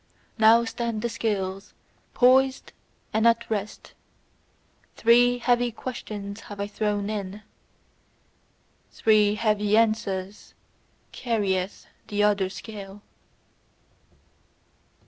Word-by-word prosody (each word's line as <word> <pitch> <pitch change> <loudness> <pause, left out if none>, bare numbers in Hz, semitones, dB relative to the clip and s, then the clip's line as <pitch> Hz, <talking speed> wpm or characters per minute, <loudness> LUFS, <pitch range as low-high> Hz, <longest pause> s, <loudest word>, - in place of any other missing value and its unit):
Now 225 +2 +6
stand 230 -1 -3
the 235 - 0
scales 200 -4 -3 0.4
poised 260 +1 +3 0.4
and 220 +1 +3
at 230 0 +2
rest: 210 -1 -4 1.0
three 245 +2 +4
heavy 245 0 +1
questions 210 -4 -7
have 205 -2 -11
I 200 - -1
thrown 205 0 -2
in; 205 -1 -5 1.5
three 210 -1 +3
heavy 210 -1 +1
answers 210 -3 -1 0.6
carrieth 200 -5 -2 0.2
the 205 0 0
other 205 -2 +2
scale. 200 0 -10
215 Hz, 90 wpm, -25 LUFS, 200-230 Hz, 1.5 s, Now